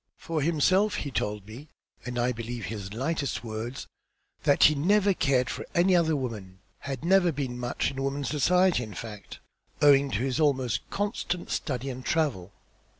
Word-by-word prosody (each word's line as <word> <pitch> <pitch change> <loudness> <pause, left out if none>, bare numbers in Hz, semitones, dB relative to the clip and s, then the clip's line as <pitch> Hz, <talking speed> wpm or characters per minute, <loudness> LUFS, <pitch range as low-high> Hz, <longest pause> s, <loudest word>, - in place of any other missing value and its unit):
For 165 -2 -3
himself, 185 +7 +2
he 140 - -4
told 105 -3 -2
me, 120 +8 -11 0.4
and 125 0 -4
I 120 +1 +1
believe 115 0 -5
his 100 -3 -6
lightest 140 +4 -2
word, 115 +2 -5 0.6
that 145 - +4
he 155 - +8
never 200 +7 +3
cared 135 -7 +1
for - - -4
any 180 +2 +4
other 160 -2 +3
woman; 105 -9 -5 0.2
had 135 +1 -5
never 185 -1 +4
been 130 -4 -4
much 120 +3 -1
in 135 0 -5
women's 135 +1 -2
society, 180 +2 +3
in 110 -5 -7
fact, 105 -1 -8 0.4
owing 140 -1 +5
to 105 - -1
his 135 +2 -1
almost 130 -6 +1
constant 200 -3 -3
study 135 -1 -2
and 130 0 -8
travel. 125 - -1
135 Hz, 165 wpm, -27 LUFS, 120-160 Hz, 0.6 s, he